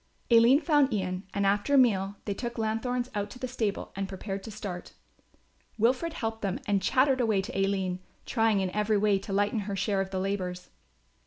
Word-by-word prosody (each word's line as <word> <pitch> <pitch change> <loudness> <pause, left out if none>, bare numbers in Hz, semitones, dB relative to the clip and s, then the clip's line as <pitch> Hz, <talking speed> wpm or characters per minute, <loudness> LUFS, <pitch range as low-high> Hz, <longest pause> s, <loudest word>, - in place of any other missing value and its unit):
Aline 235 +5 +6
found 295 -5 +3
Ian 185 -2 -2
and 200 0 0
after 205 +8 +2
a - - +7
meal 200 -6 +3
they 205 - -1
took 235 +4 -5
lanthorns 240 +3 -1
out 205 -1 -2
to 250 - -10
the 255 - -4
stable 220 -5 -2
and 195 0 -3
prepared 195 0 -5
to 220 - -9
start. 200 -4 -7 0.8
Wilfred 255 +9 +1
helped 225 -6 -3
them 195 -2 -1
and 200 -2 +1
chattered 260 +6 +3
away 220 -4 +2
to 240 +6 -7
Aline, 195 -2 0 0.3
trying 225 -4 +2
in 185 -1 -1
every 210 +1 +1
way 205 -1 +3
to 195 - -8
lighten 205 +3 +1
her 200 - -2
share 195 +1 0
of 190 - -3
the 190 -1 -3
labours. 185 -2 -3
205 Hz, 195 wpm, -28 LUFS, 195-235 Hz, 0.8 s, a